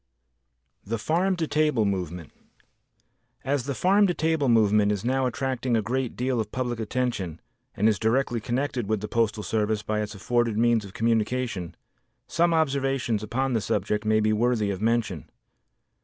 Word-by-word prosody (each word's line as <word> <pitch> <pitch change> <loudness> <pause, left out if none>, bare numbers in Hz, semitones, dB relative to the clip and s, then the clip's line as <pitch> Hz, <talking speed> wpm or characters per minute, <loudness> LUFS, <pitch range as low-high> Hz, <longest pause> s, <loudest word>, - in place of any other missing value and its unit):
The 115 +3 -3
Farm 170 - +1
to 165 -3 -2
Table 150 -8 +2
Movement 90 -5 -3 1.1
As 135 -1 -1
the 140 -1 -3
farm 200 +6 +4
to 175 - -1
table 160 -4 +1
movement 105 -2 +4
is 105 +1 -3
now 130 +1 +1
attracting 130 -1 -1
a 110 - 0
great 125 +3 -2
deal 125 0 -1
of 110 - -3
public 125 -3 -2
attention 110 -8 -2 0.4
and 105 +2 +3
is 105 -2 +2
directly 120 +1 +1
connected 125 0 -2
with 110 -1 0
the 105 - -4
postal 110 -2 0
service 105 +1 -1
by 105 0 -1
its 105 0 -5
afforded 120 +2 0
means 115 -1 +3
of 100 - -12
communication, 115 -4 -1 0.5
some 170 0 +1
observations 135 -7 0
upon 130 +5 -1
the 115 - +1
subject 105 +2 -1
may 110 0 +3
be 110 0 +2
worthy 110 -2 +1
of 95 0 -5
mention. 110 -7 -1
115 Hz, 165 wpm, -26 LUFS, 105-130 Hz, 1.1 s, farm